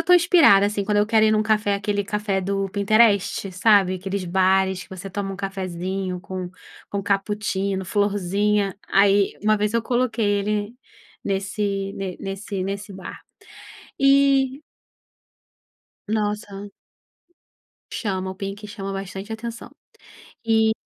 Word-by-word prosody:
estou 360 0 +6
inspirada, 325 - +6
assim, 205 -1 -2
quando 205 +1 +1
eu 210 - +3
quero 220 -1 +4
ir - - +5
em 215 - +3
um 215 - +2
café, 215 -2 +1
aquele 205 0 -1
café 210 -2 -1
do 195 +1 -1
Pinterest, 205 -1 +2
sabe? 190 -1 +4
Aqueles 190 +1 -4
bares 190 +1 +2
que - - -16
você 190 +1 -7
toma 195 0 -4
um - - -7
cafezinho 185 -1 -4
com 185 -1 -6 0.4
com 200 -1 -2
cappuccino, 200 -1 -1
florzinha, 205 0 0
aí 200 0 +4
uma 215 0 +3
vez 210 +1 0
eu 230 - +2
coloquei 240 -2 0 0.2
ele 210 +2 -2 0.5
nesse 195 0 -2
ne 190 -2 -5
nesse 195 0 -4
nesse 200 +1 -5
bar. 190 - -9 0.8
E 275 0 +3 1.5
nossa 205 -1 -3 1.2
Chama 190 -3 -2
o - - -7
pink 200 +1 -6
chama 195 -2 -6
bastante 195 +2 -6
atenção. 230 +1 -7 0.7
E 220 -1 +3
200 Hz, 130 wpm, -23 LUFS, 195-215 Hz, 1.5 s, estou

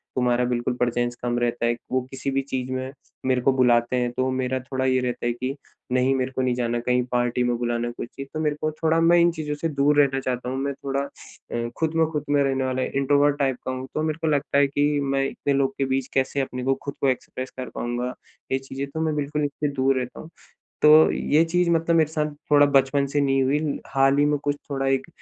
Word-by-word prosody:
तुम्हारा 125 -1 +2
बिल्कुल 125 0 -1
प्रेजेंस 120 0 0
कम 120 0 0
रहता 120 0 0
है। 120 - +2 0.2
वो 130 0 +2
किसी 135 +1 -3
भी 135 - +1
चीज़ 130 -1 -4
में 130 0 -3 0.3
मेरे 130 -1 +2
को 135 - +3
बुलाते 120 -1 +3
हैं 120 -1 0
तो 130 +1 -1
मेरा 130 0 -1
थोड़ा 130 0 -3
ये 130 0 +3
रहता 125 -1 -3
है 120 - +1
कि, 130 +3 -4 0.4
नहीं 130 +1 +3
मेरे 130 0 -1
को 130 - -2
नहीं 125 -1 +1
जाना 120 -1 -1
कहीं 125 +1 +1
पार्टी 120 0 +1
में 120 -1 +1
बुलाना 120 0 -1
कोई 120 - -6
ची 135 - -5
तो 155 - -3
मेरे 150 -2 0
को 155 - +1
थोड़ा 160 +1 +1
मैं 170 +1 +5
इन 170 0 +5
चीज़ों 150 -2 -4
से 165 +3 -2
दूर 145 0 +2
रहना 135 -2 +3
चाहता 125 -1 -3
हूँ। 130 - -3
मैं 140 +1 -2
थोड़ा 135 0 -3 0.5
अ, 120 0 -2
खुद 160 0 0
में 165 0 +4
खुद 150 -2 -2
में 145 0 +3
रहने 135 -1 0
वाला 130 0 -1
इंट्रोवर्ट 145 +1 +2
टाइप 135 -2 +1
का 130 - -1
हूँ 130 +1 -5
तो 155 - -1
मेरे 155 0 -1
को 160 - 0
लगता 145 -1 +1
है 140 0 +5
कि 145 +1 +1 0.2
मैं 135 0 0
इतने 140 - -2
लोग 135 -1 +1
के 135 - +1
बीच 130 -1 -1
कैसे 135 +1 0
अपने 125 -1 -4
को 135 +1 +2
खुद 140 - -4
को 140 - +3
एक्सप्रेस 130 0 -4
कर 125 - -4
पाऊँगा। 120 +1 -3 0.4
ये 135 - +1
चीज़ें, 135 +1 -6
तो 160 +3 -6
मैं 155 -1 0
बिल्कुल 150 +1 -1
इससे 145 +1 -2
दूर 135 0 +2
रहता 125 0 -6
हूँ। 160 - -10 0.5
तो, 155 +1 +8
ये 155 +3 +2
चीज़ 175 +1 +1
मतलब 165 0 +2
मेरे 155 -2 +3
साथ 150 -1 0 0.2
थोड़ा 145 -1 +6
बचपन 140 0 +2
से 145 +1 0
नहीं 135 -1 +2
हुई, 145 +2 0
हाल 135 0 +3
ही 145 - +5
में 150 0 +1
कुछ 145 0 0
थोड़ा 135 -1 -1
एक 135 0 +1
135 Hz, 245 wpm, -24 LUFS, 125-145 Hz, 0.5 s, तो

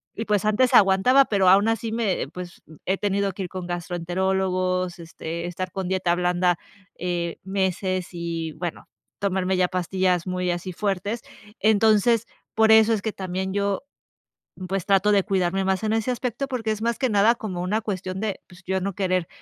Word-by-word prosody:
y 225 - -4
pues 210 -1 +1
antes 235 +4 +3
aguantaba, 200 +8 +6
pero 195 -5 +3
aún 200 +3 +6
así 225 0 -1
me 220 -4 -1
pues 180 -1 -8 0.2
he 190 +1 +1
tenido 200 -1 0
que 195 - -5
ir 180 - -5
con 185 -2 -6
gastroenterólogos, 185 +1 -1
este, 170 +1 -6
estar 180 +1 -4
con 190 -2 -4
dieta 185 -2 +1
blanda, 180 0 +1 0.4
eh, 175 -1 -3
meses 190 -1 -1
y 165 -2 -4
bueno, 170 +1 -6 0.3
tomarme 190 -1 0
ya 180 -1 +3
pastillas 185 -1 0
muy 180 0 -1
así 175 +2 -4
fuertes, 200 +4 -2 0.4
entonces, 220 +1 +4 0.3
por 220 0 +5
eso 220 +1 +6
es 215 - -1
que 220 - -2
también 190 0 -3
yo, 200 +3 -1 0.9
pues 195 -1 -2
trato 200 +1 +3
de 200 -2 +4
cuidarme 190 0 0
más 190 +2 0
en 215 - +1
ese 225 +3 0
aspecto, 250 +2 -3
porque 230 -5 -2
es 215 - -3
más 235 0 -1
que 260 - +1
nada 215 +3 +4
como 185 -7 -5
una 210 +5 0
cuestión 190 -3 -4
de 215 -3 -2
pues 180 0 -17
ya 190 +1 0
no 200 +1 -2
querer 185 -3 0
190 Hz, 180 wpm, -24 LUFS, 180-210 Hz, 0.9 s, aguantaba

